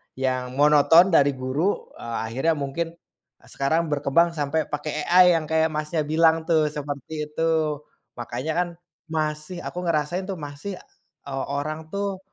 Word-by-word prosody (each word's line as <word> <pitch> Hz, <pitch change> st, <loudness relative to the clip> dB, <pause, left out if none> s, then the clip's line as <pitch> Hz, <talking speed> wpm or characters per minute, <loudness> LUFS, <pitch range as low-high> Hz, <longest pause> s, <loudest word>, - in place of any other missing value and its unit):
yang 130 Hz, -1 st, -2 dB
monoton 150 Hz, +5 st, +6 dB
dari 145 Hz, -3 st, +5 dB
guru, 135 Hz, +9 st, -1 dB
eee, 115 Hz, -1 st, -5 dB
akhirnya 135 Hz, +8 st, +1 dB
mungkin, 145 Hz, +4 st, -2 dB
eee, 130 Hz, -6 st, -28 dB
sekarang 160 Hz, +4 st, 0 dB
berkembang 145 Hz, +4 st, +3 dB
sampai 150 Hz, +1 st, -1 dB
pakai 150 Hz, +1 st, -3 dB, 0.2 s
AI 180 Hz, +1 st, +7 dB
yang 160 Hz, -1 st, -1 dB
kayak, 160 Hz, 0 st, +2 dB
Masnya, 155 Hz, +1 st, -1 dB
bilang 160 Hz, +1 st, +3 dB
tuh 155 Hz, -3 st, +3 dB
seperti 145 Hz, 0 st, -6 dB, 0.2 s
itu. 155 Hz, -2 st, 0 dB, 0.4 s
Makanya 125 Hz, +6 st, -3 dB
kan, 180 Hz, -, 0 dB, 0.4 s
masih 155 Hz, +2 st, -2 dB
aku 180 Hz, -, -5 dB
ngerasain 165 Hz, +3 st, 0 dB
tuh 190 Hz, -, -3 dB
masih, 145 Hz, +7 st, -6 dB, 0.5 s
eee, 135 Hz, -1 st, -3 dB
orang 155 Hz, +2 st, -4 dB
tuh 200 Hz, -1 st, -2 dB
155 Hz, 145 wpm, -24 LUFS, 140-165 Hz, 0.5 s, AI